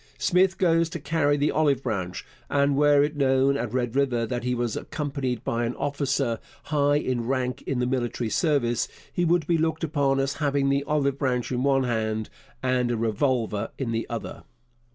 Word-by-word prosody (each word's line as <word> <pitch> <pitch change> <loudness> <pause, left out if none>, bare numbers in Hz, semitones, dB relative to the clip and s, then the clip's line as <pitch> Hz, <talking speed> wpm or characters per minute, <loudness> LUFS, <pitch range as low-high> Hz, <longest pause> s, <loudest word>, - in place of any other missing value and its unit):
Smith 185 +1 +2
goes 165 -2 +3
to 170 - -5
carry 145 -1 +1
the 145 +1 +1
olive 145 -4 +2
branch, 90 -4 -3 0.2
and 140 0 +2
were 145 0 +5
it 150 +1 -1
known 135 -1 +3
at 120 -5 -2
Red 125 -1 -1
River 130 -4 +1
that 120 +1 -3
he 125 0 0
was 120 -2 -1
accompanied 135 -5 -3
by 120 -1 -1
an 120 +1 -2
officer 140 -4 -1 0.2
high 145 -1 +2
in 125 -5 -1
rank 130 -1 -1
in 135 - -1
the 125 - +1
military 120 -3 -2
service, 135 -8 +1 0.3
he 175 - 0
would 170 -1 +2
be 165 0 +1
looked 160 +1 0
upon 140 -3 +1
as 135 +1 -1
having 140 -1 +1
the 140 0 +1
olive 140 -2 0
branch 125 -3 -1
in 125 -1 -1
one 135 0 +3
hand 110 -3 -2 0.3
and 125 -1 +1
a 120 - 0
revolver 110 -1 0
in 130 -4 -2
the 115 0 -2
other. - - -5
135 Hz, 190 wpm, -25 LUFS, 120-145 Hz, 0.3 s, were